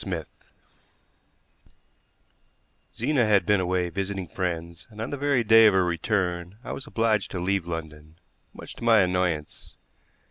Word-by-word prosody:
SMITH - - -4 2.7
Zena 130 -7 +1
had 100 -2 +3
been 105 -2 +3
away 90 -1 0
visiting 95 0 -4
friends 85 0 -5
and 105 -1 -14
on 110 - -4
the - - -2
very 140 -3 +1
day 110 0 +7
of 105 - +3
her 95 -1 +3
return 90 0 -2
I - - -6
was 135 - -6
obliged 110 -6 0
to 90 - -5
leave 95 0 -1
London, 80 -1 -7 0.3
much - - -10
to - - -10
my 115 -3 +5
annoyance. 90 -4 -2
95 Hz, 145 wpm, -25 LUFS, 85-110 Hz, 2.7 s, day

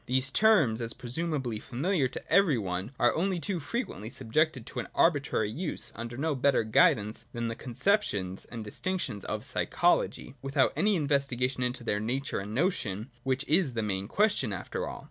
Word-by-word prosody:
These 130 +2 +1
terms, 165 - +4
as 115 0 -3
presumably 130 -2 -2
familiar 140 - 0
to 125 - -8
every 190 -9 +5
one, 95 +1 -3
are 120 - +4
only 180 +2 0
too 185 +1 -2
frequently 145 - -4
subjected 130 +1 0
to - - -6
an - - -4
arbitrary 140 -9 +2
use, 155 +7 -3
under 115 +1 -6
no 155 +3 0
better 135 -2 +2
guidance 110 0 +3
than 115 -1 -2
the 115 - -4
conceptions 120 - 0
and 115 -2 -7
distinctions 120 - -3
of - - -4
psychology, - - +1
without 135 0 +2
any 210 0 +3
investigation 140 -4 +1
into 125 0 -1
their 105 -3 0
nature 130 +6 -2
and 105 +2 -6
notion, 125 - -1
which 135 +2 -1
is 155 -4 +3
the 115 -1 -1
main 100 -2 0
question 205 - +2
after 95 -2 -4
all. - - -6
130 Hz, 170 wpm, -29 LUFS, 110-155 Hz, -, every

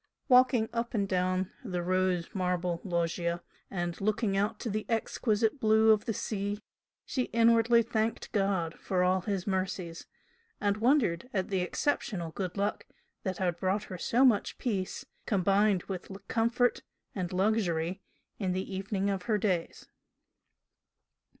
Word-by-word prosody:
Walking 250 -3 +5
up 235 0 -2
and 200 -2 +1
down 185 0 0
the 180 -6 -3
rose 185 -1 0
marble 180 -2 -1
loggia 170 -1 -1 0.3
and 175 -2 -3
looking 210 0 +1
out 210 +2 0
to - - -3
the 215 +1 -3
exquisite 225 +1 0
blue 220 0 +5
of 215 -1 +3
the 225 - -1
sea, 205 -1 -2 0.5
she 255 -2 -1
inwardly 230 0 +4
thanked 225 -1 -2
God 195 -5 0
for 180 -1 0
all 185 +1 +2
His 195 -1 -2
mercies, 185 -3 -3 0.5
and 205 0 +1
wondered 235 - +2
at 190 -2 0
the 190 -2 0
exceptional 180 - -1
good 185 +2 -4
luck 200 +1 -1 0.3
that 185 -2 -3
had 175 -3 0
brought 190 +3 0
her 185 - -7
so 250 +8 +3
much 225 -6 +2
peace, 195 -7 -2 0.2
combined 200 -1 +3
with 185 -3 -6 0.2
comfort 235 +2 +2 0.3
and 180 -3 -3
luxury 185 -3 0 0.4
in 190 -3 0
the 190 +1 -3
evening 195 +1 -1
of 195 -2 -2
her 220 -3 +2
days. 185 -5 -2
195 Hz, 145 wpm, -30 LUFS, 180-220 Hz, 0.5 s, Walking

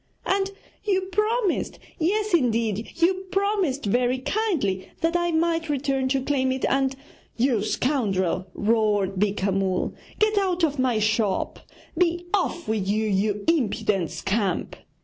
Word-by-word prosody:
And 390 0 +1 0.3
you 390 -3 +1
promised 425 0 0 0.2
yes, 420 +5 0
indeed, 230 - +1
you 370 +3 +1
promised 390 - 0
very 245 +4 +2
kindly 260 - -1
that 330 +1 +1
I 345 0 +2
might 330 0 +1
return 270 -2 0
to 265 0 0
claim 265 -2 +1
it, 260 0 -1
and 270 0 +1 0.2
' - - -32
'You 235 -3 +2
scoundrel,' 195 - 0
roared 210 -3 +1
Beeka 200 -1 +1
Mull, 190 -1 0 0.2
'get 430 -1 +3
out 365 -3 0
of 295 -3 +1
my 255 -3 +2
shop! 215 -2 0 0.4
Be 345 +1 +1
off 350 -4 0
with 215 -3 -1
you, 215 +2 +1
you 205 0 0
impudent 210 - +1
scamp! 195 -2 -1
260 Hz, 140 wpm, -25 LUFS, 210-345 Hz, 0.4 s, get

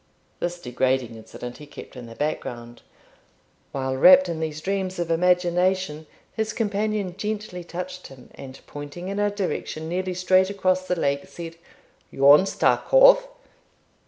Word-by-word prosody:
this 175 0 -3
degrading 130 -3 -1
incident 120 +2 -9
he 150 - -12
kept 145 - -12
in 125 -2 -9
the 115 - -11
background. 120 -5 -4 0.9
While 130 -1 -2
wrapt 275 - +7
in 165 -2 -4
these 155 -1 -3
dreams 190 +2 -3
of 170 -1 -2
imagination, 180 -2 +1 0.3
his 220 0 -2
companion 210 -3 -2
gently 210 -3 -4
touched 180 +2 -7
him, 130 -2 -15
and, 130 -1 -11
pointing 145 +5 -8
in 200 +1 -3
a 205 0 +2
direction 185 -5 -4
nearly 180 +2 -2
straight 185 +1 +3
across 185 -2 0
the 180 - 0
lake, 140 -4 -1
said, 165 -1 -9 0.5
'Yon's 145 +8 +5
ta - - +3
cove.' - - +6
175 Hz, 145 wpm, -24 LUFS, 145-190 Hz, 0.9 s, wrapt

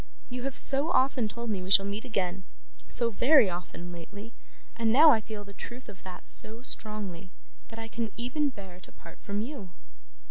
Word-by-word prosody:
You 250 0 -5
have 275 -1 -4
so 280 +3 +4
often 260 -6 +2
told 235 +1 -5
me 195 -3 -3
we 185 - -7
shall 195 0 +6
meet 200 +2 -5
again 190 -5 -2 0.4
so 235 -1 +4
very 250 - +5
often 175 0 -7
lately, 200 +7 -10 0.4
and 230 -1 +1
now 300 +6 +8
I 225 - +3
feel 215 -1 -8
the 200 0 -13
truth 240 +6 -9
of 200 -2 -12
that 185 -1 -10
so 225 +3 +3
strongly 200 -7 -6 0.4
that 225 - -12
I 225 0 -6
can 225 -1 -4
even 265 +5 -1
bear 190 -7 -11
to - - -16
part 165 - -15
from 200 +1 -4
you. 230 -6 -7
215 Hz, 190 wpm, -28 LUFS, 195-245 Hz, 0.4 s, now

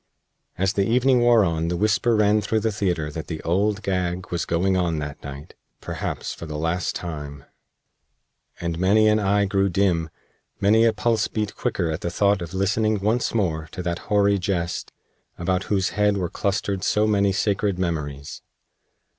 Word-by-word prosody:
As 95 +2 +1
the 100 -1 +1
evening 125 +2 +4
wore 120 -3 +5
on 80 -1 -1
the 85 +1 -1
whisper 110 +4 +2
ran 105 0 +3
through 110 +1 0
the 110 +1 0
theater 90 -8 -1
that 80 +1 -6
the 80 -2 -5
Old 100 +4 0
Gag 90 -2 -2
was 85 - -1
going 95 +3 +1
on 85 -3 0
that 75 -1 -5
night 70 +2 -9 0.3
perhaps - - -4
for 85 - -9
the 75 -1 -5
last 80 +3 -1
time; 75 -5 -6 1.1
and 85 -1 -3
many 105 +4 +4
an 105 0 +4
eye 100 0 +2
grew 100 0 +1
dim, 85 -3 +1 0.5
many 110 +3 +4
a 115 - +5
pulse 110 0 0
beat 105 -2 -3
quicker 85 -2 -1
at 80 - -4
the 85 - -2
thought 100 +2 +2
of 85 +2 -6
listening 105 +3 +1
once 110 +4 0
more 80 -7 -1
to 90 - -5
that 85 -1 -2
hoary 100 -1 +3
Jest, 90 -2 -2 0.5
about 90 +2 -1
whose 95 -3 +1
head 105 -1 +1
were 90 -3 -2
clustered 100 -1 -2
so 105 +1 +2
many 100 -2 +2
sacred 100 -1 0
memories. 75 -6 -4
95 Hz, 175 wpm, -23 LUFS, 85-105 Hz, 1.1 s, wore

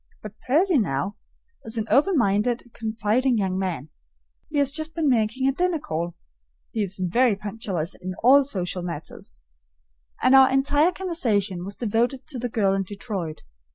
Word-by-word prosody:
But 210 -2 -8
Percy, 320 +4 +3
now, 185 - -1 0.5
is 225 +1 -3
an 220 - -1
open 310 +6 +4
minded, 230 +2 +1
confiding 225 +3 0
young 190 -2 -1
man. 165 -7 -3 0.6
He 300 - -3
has 280 -1 +3
just 315 +2 -3
been 325 -3 0
making 245 +1 +1
a - - +4
dinner 355 +4 0
call 170 - -4 0.6
(he 220 - -2
is 195 -2 -2
very 210 +6 +2
punctilious 195 -5 -4
in 185 0 -7
all 275 +4 +7
social 185 -8 -3
matters), 170 -3 -8 0.8
and 255 - +5
our 265 -1 +8
entire 285 +5 +3
conversation 220 - -1
was 200 +2 -6
devoted 240 +3 0
to 265 -5 -5
the 245 +1 -3
girl 200 -4 +1
in 195 - 0
Detroit. 195 -5 -5
225 Hz, 160 wpm, -24 LUFS, 195-270 Hz, 0.8 s, our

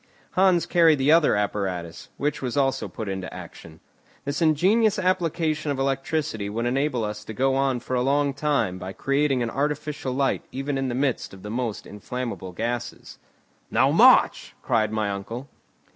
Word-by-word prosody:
Hans 185 -2 +3
carried 165 -3 +4
the 135 +2 +3
other 165 -6 +5
apparatus, 95 -5 -3
which 150 +1 -1
was 125 0 -3
also 135 -6 +1
put 105 +4 -7
into 95 -1 -4
action. 80 -1 -11 0.4
This 140 +4 -2
ingenious 190 +8 +3
application 165 -5 0
of 140 - -1
electricity 135 -4 -1
would 115 +3 -2
enable 130 -1 0
us 105 0 -4
to 110 - -8
go 135 +3 +2
on 135 -2 +1
for 130 - -3
a 125 - +1
long 140 +2 +1
time 140 -10 0
by 95 +1 -6
creating 135 0 +1
an 115 - -3
artificial 145 -1 -2
light 135 +1 0
even 135 +1 -3
in 135 -1 -1
the 120 - -2
midst 130 -6 -1
of 95 - -15
the 105 - -6
most 120 -2 -3
inflammable 110 -2 -6
gases. 120 +5 -5 0.5
"Now, - - +3
march!" - - +5
cried 110 -2 +1
my 110 -2 -1
uncle. 115 +7 -6
135 Hz, 170 wpm, -24 LUFS, 110-150 Hz, 0.5 s, other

